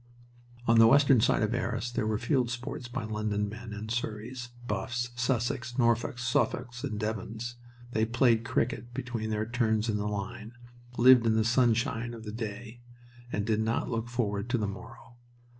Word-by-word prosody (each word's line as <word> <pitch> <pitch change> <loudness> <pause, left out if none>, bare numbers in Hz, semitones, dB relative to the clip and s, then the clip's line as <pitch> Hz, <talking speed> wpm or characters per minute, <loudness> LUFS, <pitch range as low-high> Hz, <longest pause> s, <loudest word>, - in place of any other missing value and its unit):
On 115 -1 +5
the 115 - +9
western 135 -1 +6
side - - +3
of - - 0
Arras 120 - -2
there 110 -3 -1
were 110 -1 +1
field 125 0 +1
sports 120 +1 -5
by 120 0 -4
London 105 -1 -1
men, 110 +2 -8
and 105 +1 -6
Surreys, 120 +2 -4 0.2
Buffs, 120 +3 -2
Sussex, 120 0 -1
Norfolks, 120 0 +1
Suffolks, 120 +1 0
and 105 - -3
Devons. 110 +2 -4 0.3
They 110 -1 +2
played 115 -1 +3
cricket 120 0 -2
between 120 -4 -3
their 110 0 -1
turns 115 -2 +1
in 105 - +1
the 105 0 -2
line, 110 +3 -5 0.4
lived 125 -1 +7
in 110 - +3
the 110 -1 +2
sunshine 120 0 +1
of 115 - -10
the 105 -1 -6
day, 115 +1 -6 0.5
and 105 - -1
did 110 -1 +1
not 115 +3 -1
look 115 0 -2
forward 110 -3 -1
to 125 - +2
the 105 -3 -1
morrow. 115 +5 -10
115 Hz, 175 wpm, -29 LUFS, 110-120 Hz, 0.5 s, the